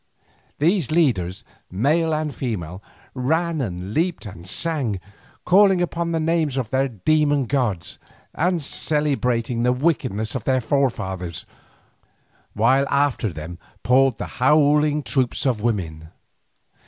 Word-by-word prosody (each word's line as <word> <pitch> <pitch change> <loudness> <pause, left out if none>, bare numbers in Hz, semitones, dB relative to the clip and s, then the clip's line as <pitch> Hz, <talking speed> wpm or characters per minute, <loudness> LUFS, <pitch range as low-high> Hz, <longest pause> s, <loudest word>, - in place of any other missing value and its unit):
These 170 - +2
leaders, 115 - +1 0.3
male 150 - +1
and 155 -1 -1
female, 95 - -4 0.3
ran 160 +5 0
and 95 -3 -4
leaped 165 -3 -1
and 90 -3 -10
sang, 130 - -1 0.5
calling 195 0 +5
upon 170 -1 -1
the 165 - 0
names 160 -3 0
of 125 -5 -2
their 135 +1 +2
demon 145 +4 +1
gods, 120 -10 -2 0.3
and 175 -1 0
celebrating 125 -6 0
the 125 +1 +3
wickednesses 125 - 0
of 125 - -4
their 130 -1 +2
forefathers, 110 - -2 1.1
while 130 +6 +3
after 140 -5 +1
them 80 +1 -8 0.2
poured 130 -2 +3
the - - -4 0.2
howling 150 +1 +4
troops 130 -2 -1
of 120 -6 +1
women. 80 -9 -2
135 Hz, 120 wpm, -22 LUFS, 110-155 Hz, 1.1 s, calling